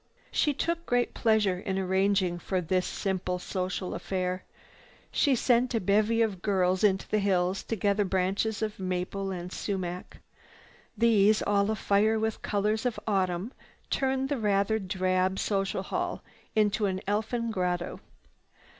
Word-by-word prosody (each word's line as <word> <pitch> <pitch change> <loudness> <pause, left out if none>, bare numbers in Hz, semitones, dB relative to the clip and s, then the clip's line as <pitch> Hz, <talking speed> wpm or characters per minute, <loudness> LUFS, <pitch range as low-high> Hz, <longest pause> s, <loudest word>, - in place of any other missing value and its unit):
She 295 - +2
took 335 +4 -2
great 245 0 +1
pleasure 215 -5 +2
in 190 0 -3
arranging 190 -1 +1
for 185 +1 -1
this 180 +1 0
simple 185 -2 -2
social 185 0 -3
affair. 185 -1 -2 0.7
She 280 -2 +3
sent 245 0 +2
a - - +3
bevy 215 +4 +3
of 200 -5 -2
girls 185 -2 +1
into 190 -2 +2
the 215 - +1
hills 190 -1 +1
to 225 - -2
gather 205 0 +1
branches 195 +3 0
of 215 -2 -3
maple 185 +1 -2
and 180 -1 -5
sumac. 180 -3 -4 0.8
These, 215 -2 +4
all 200 0 +2
afire 215 0 +2
with 220 0 -2
colors 215 +3 0
of 240 - -3
autumn, 190 +1 0 0.4
turned 265 0 0
the 285 -3 -1
rather 210 +1 +2
drab 185 -1 0
social 195 -2 -1
hall 360 - -3 0.3
into 215 0 +2
an 185 -1 -2
elfin 225 +3 -1
grotto. 180 -3 -2
200 Hz, 140 wpm, -28 LUFS, 185-220 Hz, 0.8 s, These